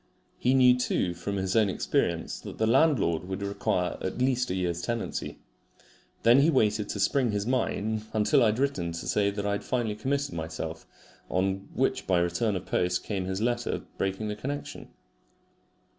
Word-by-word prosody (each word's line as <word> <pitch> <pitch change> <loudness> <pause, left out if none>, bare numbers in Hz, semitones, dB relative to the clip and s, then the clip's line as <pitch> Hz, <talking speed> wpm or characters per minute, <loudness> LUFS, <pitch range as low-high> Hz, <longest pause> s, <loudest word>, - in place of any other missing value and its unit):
He 130 +2 +3
knew 125 -1 +6
too 90 -7 0
from 100 +4 -4
his 95 -1 -1
own 110 -3 +4
experience - - -1
that - - -9
the 110 - +2
landlord 115 - +3
would 95 +2 -4
require 90 -2 -1
at 95 - -3
least 125 0 +1
a 90 - -1
year's 90 -2 -1
tenancy. 115 +5 -3 0.9
Then 120 +3 +7
he 145 +4 +5
waited 105 -7 +2
to 100 - -3
spring 125 +5 +2
his 105 -1 -1
mine 110 -3 -1
until 105 -1 +3
I 115 - +5
had 105 +1 +1
written 125 -12 -1
to 85 - -6
say 100 -1 +2
that 100 0 -4
I 100 - +1
had 100 - -2
finally 120 -4 -1
committed 140 +2 -2
myself, 80 0 -5 0.4
on 95 +1 -1
which - - 0
by 90 - +3
return 85 +5 +1
of 90 - -4
post 90 0 0
came 95 -3 -3
his 95 +2 -3
letter 120 0 -1 0.2
breaking 95 +2 -1
the 105 - -3
connection. 140 +7 -5
105 Hz, 180 wpm, -28 LUFS, 95-120 Hz, 0.9 s, Then